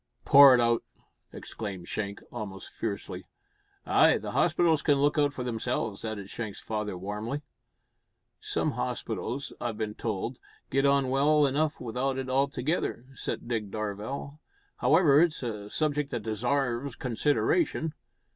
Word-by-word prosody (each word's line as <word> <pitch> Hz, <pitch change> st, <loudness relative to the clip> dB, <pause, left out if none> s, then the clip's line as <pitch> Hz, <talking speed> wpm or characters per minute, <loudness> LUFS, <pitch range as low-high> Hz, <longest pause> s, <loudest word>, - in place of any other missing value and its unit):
"Pour 140 Hz, -2 st, +9 dB
it -, -, +2 dB
out!" 115 Hz, -1 st, +3 dB, 0.5 s
exclaimed 100 Hz, -5 st, -7 dB
Shank, 100 Hz, -1 st, -4 dB
almost 105 Hz, -5 st, -7 dB
fiercely. 100 Hz, -4 st, -5 dB, 0.6 s
"Ay, -, -, +5 dB
the -, -, -6 dB
hospitals 165 Hz, -4 st, +3 dB
can 145 Hz, -, +3 dB
look 145 Hz, +2 st, +2 dB
out 145 Hz, -1 st, +3 dB
for 130 Hz, -3 st, -5 dB
themselves," 115 Hz, -3 st, -2 dB
added 110 Hz, -3 st, -4 dB
Shank's 110 Hz, -1 st, -6 dB
father 105 Hz, -3 st, -3 dB
warmly. 105 Hz, +9 st, -4 dB, 1.0 s
"Some -, -, -1 dB
hospitals, 135 Hz, +3 st, -3 dB
I've 115 Hz, -3 st, -3 dB
bin 105 Hz, -1 st, -3 dB
told, 115 Hz, +3 st, -3 dB, 0.3 s
git 135 Hz, +1 st, +3 dB
on 140 Hz, -2 st, +3 dB
well 145 Hz, +2 st, +4 dB
enough 150 Hz, +3 st, 0 dB
without 125 Hz, +3 st, -2 dB
it 130 Hz, -1 st, -3 dB
altogether," 135 Hz, -1 st, 0 dB
said 120 Hz, -, -5 dB
Dick 110 Hz, -4 st, -2 dB
Darvall. 110 Hz, +8 st, -5 dB, 0.4 s
"However, 150 Hz, +1 st, +5 dB
it's 170 Hz, -5 st, +1 dB
a 105 Hz, -4 st, -5 dB
subject 150 Hz, +1 st, 0 dB
that 115 Hz, -, -4 dB
desarves 125 Hz, +3 st, -1 dB
consideration. 150 Hz, -, +1 dB
125 Hz, 135 wpm, -28 LUFS, 110-140 Hz, 1.0 s, Pour